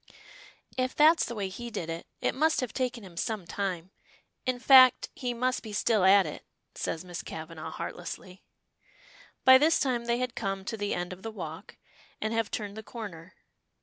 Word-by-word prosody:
"If 255 0 -1
that's 315 +2 +6
the 235 - -5
way 200 -3 -2
he 235 +5 -7
did 175 -7 -4
it, 165 0 -5
it - - +1
must 310 +4 +2
have 255 - -4
taken 250 -3 -2
him 180 -3 -12
some 210 -1 -2
time. 185 -1 -3 0.6
In 255 -1 +1
fact, 255 -1 +7
he 250 -2 -3
must 250 +2 0
be 215 -2 -8
still 210 -1 +2
at 195 +1 +7
it," - - -7 0.3
says 165 +3 -4
Miss 175 -1 -6
Kavanagh, 160 0 -7
heartlessly. 175 +2 -7 1.0
By 260 0 +9
this 320 +3 +4
time 245 -4 0
they 235 0 +1
had 250 -1 -2
come 195 -1 -3
to 225 - -3
the 205 -1 -2
end 175 +1 -3
of 185 - -12
the 225 - -5
walk, 180 -3 -8 0.4
and 220 +1 -2
have 225 -2 0
turned 205 -1 -4
the 220 - -6
corner. 200 -7 -9
215 Hz, 185 wpm, -29 LUFS, 185-250 Hz, 1.0 s, By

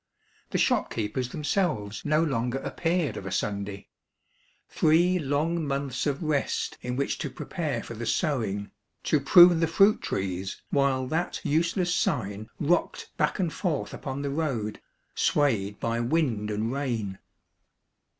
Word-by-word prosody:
The - - -1
shopkeepers 115 +3 0
themselves 150 - -1
no 155 +2 +2
longer 125 -4 -1
appeared 165 +3 -1
of 95 - -6
a - - -5
Sunday. 100 0 -3 0.8
Three 175 +4 +3
long 155 +3 0
months 140 0 -2
of 145 +3 -1
rest 150 -3 -1
in 125 0 -3
which 140 +2 -1
to 150 - -3
prepare 145 -4 -3
for - - -8
the 115 0 -5
sowing, 110 - -1 0.3
to 150 - +2
prune 175 +4 +8
the 165 - +2
fruit 195 +6 +4
trees 95 0 -3
while 140 -2 +2
that 160 +7 -2
useless 170 +4 +1
sign 105 - -1
rocked 170 +4 0
back - - +1
and 175 -5 -1
forth 170 -7 -2
upon 135 0 -5
the 140 - -2
road, 135 -9 -2 0.3
swayed 105 -9 +1
by 115 0 -1
wind 120 -5 0
and 105 +2 -1
rain. 115 -9 -2
140 Hz, 140 wpm, -27 LUFS, 110-160 Hz, 0.8 s, prune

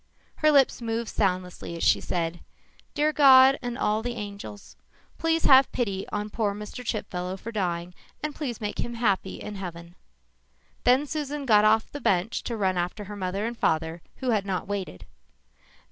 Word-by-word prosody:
Her 305 0 +4
lips 275 -4 +4
moved 230 0 -2
soundlessly 180 -3 -2
as - - -4
she - - +4
said, 170 -1 -2 0.6
Dear 305 +1 +2
God 270 -2 +7
and 245 -1 -4
all 215 -3 +1
the 240 +1 -4
angels 200 - -8 0.4
please 330 0 +1
have 265 -1 +7
pity 200 -6 -2
on 210 0 -3
poor 205 -3 -1
Mr. 210 +4 -7
Chipfellow 190 -5 -3
for 230 +4 -7
dying 180 -4 -2 0.3
and 300 -1 -2
please 260 -8 -4
make 210 -1 -4
him 240 - -3
happy 200 -5 0
in 210 - -7
heaven. 170 -2 -8 0.9
Then 255 +4 +4
Susan 295 -1 -4
got 210 -4 +5
off 220 +1 +3
the 290 - -7
bench 185 +3 +1
quickly - - -32
to 235 - -3
run 190 -3 +1
after 180 +4 -3
her 205 +1 -8
mother 195 +1 -2
and 235 +1 -3
father 160 -4 0
who 255 -2 -1
had 210 -3 +1
not 190 -2 -3
waited. 190 - -5
210 Hz, 175 wpm, -26 LUFS, 185-245 Hz, 0.9 s, God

